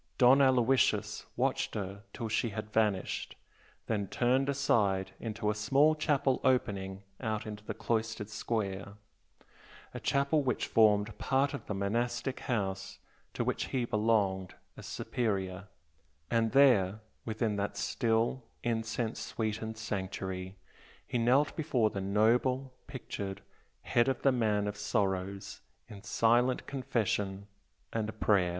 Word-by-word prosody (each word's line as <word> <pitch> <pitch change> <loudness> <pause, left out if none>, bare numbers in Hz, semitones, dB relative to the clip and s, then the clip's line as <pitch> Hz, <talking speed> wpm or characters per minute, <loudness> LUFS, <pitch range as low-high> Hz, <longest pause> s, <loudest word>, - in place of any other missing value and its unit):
Don 130 +2 +7
Aloysius 130 -1 +3
watched - - 0
her 100 -1 -4
till 115 - -4
she 110 +2 0
had 110 0 -6
vanished, 105 -4 0 0.5
then 100 -3 -1
turned 130 +6 +1
aside 105 -9 +1
into 105 -2 -2
a - - -1
small 135 +9 +4
chapel 145 -4 +1
opening 100 -7 0 0.2
out 110 -3 -2
on 105 -1 -6
the - - -3
cloistered 110 -2 -1
square 100 -2 -3 1.0
a - - -5
chapel 140 +3 +2
which 130 -3 0
formed 105 -1 +3
part 135 +1 +1
of 140 - -6
the 105 - -2
monastic 120 +6 -1
house 95 -7 -2 0.4
to - - 0
which - - -1
he 125 -3 -1
belonged 105 -4 +1 0.2
as - - -10
Superior, 100 -4 -2 0.6
and 115 -1 +2
there, 110 -8 +5 0.2
within 110 -1 -1
that 100 0 -2
still, 115 +4 0 0.2
incense 115 0 -1
sweetened 110 0 -3
sanctuary, 95 -2 -4 0.5
he 120 - -1
knelt 130 +5 +3
before 130 -9 +1
the 100 - -3
noble, 120 +6 +2
pictured 100 -7 -6 0.4
Head 120 +1 +2
of 135 -2 -1
the 135 - +5
Man 110 -5 +1
of 105 0 -4
Sorrows 100 -1 -2 0.3
in 105 -4 -10
silent 120 +4 +2
confession 105 -7 -1 0.5
and 110 -1 -3
prayer. 95 -4 +3
110 Hz, 130 wpm, -31 LUFS, 100-125 Hz, 1.0 s, Don